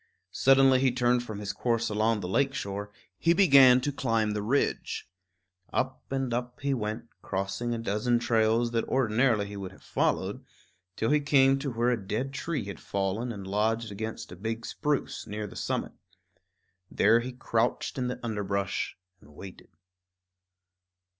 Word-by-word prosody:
Suddenly 135 -1 +5
he 130 -1 +3
turned 125 0 +2
from 110 -4 -7
his 100 -1 -4
course 115 -1 0
along 110 0 +1
the 90 - -4
lake 135 +8 +1
shore; 100 -1 -4 0.3
he 170 - +4
began 135 -9 +7
to 145 - -1
climb 115 -6 0
the 105 0 -2
ridge. 125 +7 -1 0.6
Up 130 0 -3
and 135 -3 -1
up 125 +1 -3
he 140 0 0
went, 115 -1 -3
crossing 95 +5 -3
a 120 - -1
dozen 115 +2 0
trails 115 0 +2
that 115 -1 0
ordinarily 115 -3 +2
he 100 0 -8
would 95 -2 -6
have 95 - -18
followed, - - -1 0.5
till 110 - 0
he 150 - +4
came 135 -2 +4
to 140 -1 -3
where 120 +2 +1
a 120 -3 -1
dead 130 +7 -2
tree 145 -4 -3
had 100 -2 -7
fallen 100 +5 -2
and 100 -4 -7
lodged 110 +3 0
against 110 0 -6
a - - -8
big 115 +4 -4
spruce, 150 -2 -2
near 105 +1 -4
the 105 - -10
summit. - - -2 1.0
There 115 +3 +4
he 125 +2 -5
crouched 120 +1 -1
in 125 - 0
the 125 - -4
underbrush 100 -3 -2 0.2
and 75 -4 -19
waited. 95 +2 -11
115 Hz, 165 wpm, -28 LUFS, 105-130 Hz, 1.0 s, began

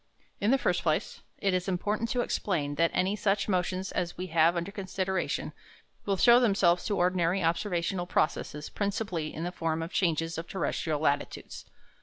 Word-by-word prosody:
In 205 - +1
the 270 - +5
first 180 -8 0
place, 155 -2 -1 0.2
it 195 -1 0
is 185 0 0
important 210 +5 -1
to 250 - +1
explain 160 -11 -1
that 165 +3 +2
any 190 +3 +1
such 200 -1 +1
motions 185 0 -1
as 175 -1 -2
we 180 - -3
have 165 +1 +5
under 170 +3 -3
consideration 190 -1 -2 0.5
will 195 -1 +1
show 240 +5 +7
themselves 195 -7 +3
to 205 - 0
ordinary 180 +1 +2
observational 175 +1 0
processes 150 -2 -1
principally 200 -6 -2
in 160 - -5
the 175 - -2
form 165 -2 -2
of 165 - -7
changes 165 -2 0
of 165 - -7
terrestrial 160 -4 -1
latitudes. 145 -2 -2
180 Hz, 170 wpm, -29 LUFS, 165-200 Hz, 0.5 s, show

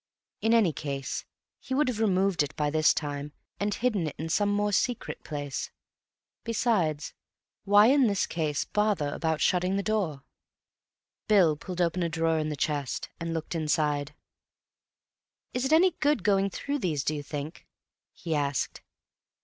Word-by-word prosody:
In 225 - +2
any 200 -9 +4
case 140 -3 -4 0.3
he 260 - -4
would 295 +1 +2
have 240 -4 -2
removed 195 -4 +2
it 145 +1 -2
by 150 -1 0
this 155 0 +4
time, 145 -1 -3 0.3
and 205 +1 0
hidden 210 -7 0
it 150 - -5
in 160 +1 -4
some 205 +5 +2
more 205 0 +1
secret 240 +4 -1
place. 145 -3 -4 0.7
Besides, 185 -10 0 0.5
why 205 +1 +7
in 265 +1 +5
this 200 -2 +1
case 155 -3 -1
bother 210 -8 +1
about 160 -2 -1
shutting 180 +1 +2
the 200 - 0
door? 190 -11 -1 1.0
Bill 185 -8 +5
pulled 180 +4 -5
open 175 +1 +1
a 170 - 0
drawer 165 0 +1
in 155 0 -1
the 150 - -3
chest, 145 -2 -2
and 165 0 -3
looked 165 0 -3
inside. 150 -2 0 1.4
"Is 250 +1 -1
it 265 - 0
any 350 +4 +6
good 295 - +2
going 195 0 +3
through 280 +9 -3
these, 155 - -1
do 155 - 0
you 150 - -3
think?" 145 +2 -7 0.4
he 165 -3 -5
asked. 145 -2 -1
170 Hz, 160 wpm, -28 LUFS, 150-210 Hz, 1.4 s, why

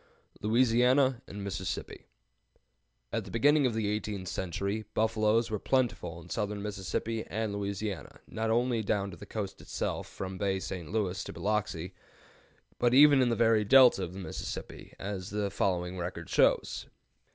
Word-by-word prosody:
LOUISIANA 125 +3 +3
AND 100 0 -7
MISSISSIPPI. 95 -2 -5 1.1
At - - 0
the - - -11
beginning 145 +4 +4
of 115 - -2
the 110 -2 0
eighteenth 105 -2 -3
century, 100 +4 -2
buffaloes 110 +1 +2
were 105 - -1
plentiful 115 -11 0
in 85 - -13
southern 105 -1 -2
Mississippi 105 +2 -3
and 110 -1 -2
Louisiana, 100 -1 -4
not 110 0 -3
only 120 0 +2
down 100 -2 -1
to 85 - -10
the - - -11
coast 100 -3 -5
itself, - - -3
from 95 -1 -6
Bay 100 -1 +1
St. 90 -4 -6
Louis 100 -4 -1
to - - -7
Biloxi, 100 -4 -2 0.9
but 120 0 +3
even 145 -1 +8
in 125 - +3
the 115 - +1
very 115 -2 +4
Delta 125 -2 +7
of 90 0 -5
the 95 - -7
Mississippi, 95 - -7
as 95 -1 -5
the 105 -1 -2
following 90 -1 -1
record 90 +1 -5
shows. - - +2
105 Hz, 155 wpm, -30 LUFS, 95-115 Hz, 1.1 s, even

